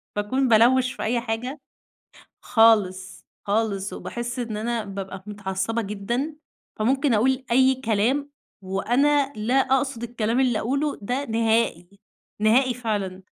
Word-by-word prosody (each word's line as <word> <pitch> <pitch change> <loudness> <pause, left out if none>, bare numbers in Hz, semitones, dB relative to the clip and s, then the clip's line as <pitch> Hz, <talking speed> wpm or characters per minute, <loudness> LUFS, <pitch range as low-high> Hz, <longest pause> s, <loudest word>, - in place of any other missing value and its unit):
بأكون 255 +6 0
بالَوَّش 250 +3 +4
في - - -6
أي 235 +1 0
حاجة. 245 +5 -4 0.8
خالص 195 -5 +2 0.2
خالص، 200 -2 -1
وباحِس 240 +1 -5
إن 225 -3 -3
أنا 230 +1 -2
بابقى 195 -1 -7
متعصِّبة 205 +2 -3
جدًا، 235 +9 -3 0.4
فممكن 265 +4 +2
أقول 260 +4 +1
أي 260 +2 +4
كلام 235 +7 +1 0.3
وأنا 270 +9 +1
لا 220 +4 -2
أقصد 265 -2 +1
الكلام 235 0 -1
اللي 245 -5 +2
أقوله 280 +5 -1
ده 250 +7 -2
نهائي، 225 -6 0 0.5
نهائي 245 +4 +3
فعلًا. 205 -6 -3
230 Hz, 120 wpm, -24 LUFS, 210-260 Hz, 0.8 s, بالَوَّش